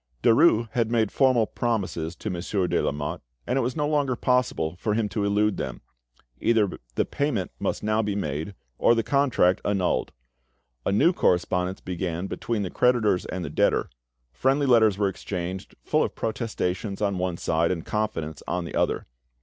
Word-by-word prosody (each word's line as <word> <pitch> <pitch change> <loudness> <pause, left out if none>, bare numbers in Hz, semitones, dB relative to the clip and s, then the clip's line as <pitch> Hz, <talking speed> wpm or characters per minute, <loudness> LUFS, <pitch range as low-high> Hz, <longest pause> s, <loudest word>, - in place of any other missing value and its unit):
Derues 115 -1 +5
had 115 -1 0
made 115 -3 +1
formal 130 -5 +3
promises 95 -9 -2
to 110 - -5
Monsieur 90 +2 -1
de 90 - +1
Lamotte, 75 +4 -2 0.2
and - - -1
it 135 - +2
was 125 +1 -2
no 150 -2 0
longer 145 -4 +1
possible 125 -11 0
for 105 +3 -1
him 110 -1 +1
to 105 - -2
elude 105 +1 +2
them. 65 -2 -4 0.6
Either 110 -5 +2 0.2
the - - +2
payment 135 -10 -1
must - - -2
now 110 +1 +2
be 105 -2 -2
made, 80 +1 -3 0.2
or 120 - +5
the 115 - +1
contract 130 -11 +2
annulled. 95 -3 0 0.8
A - - +2
new 135 - +4
correspondence 90 - +1
began 90 -1 -3
between 110 +1 -2
the 95 - -4
creditors 115 -7 +2
and 90 -1 -4
the - - -6
debtor; - - +1 0.4
friendly 135 - +1
letters 110 -6 +5
were 100 -1 +2
exchanged, 95 -1 -5
full - - +2
of - - -1
protestations 105 -4 -2
on 100 -3 0
one 90 -2 -1
side 85 0 +1
and 85 -3 -2
confidence 80 -8 -2
on 90 -1 -2
the - - -7
other. - - 0
105 Hz, 175 wpm, -25 LUFS, 90-115 Hz, 0.8 s, Derues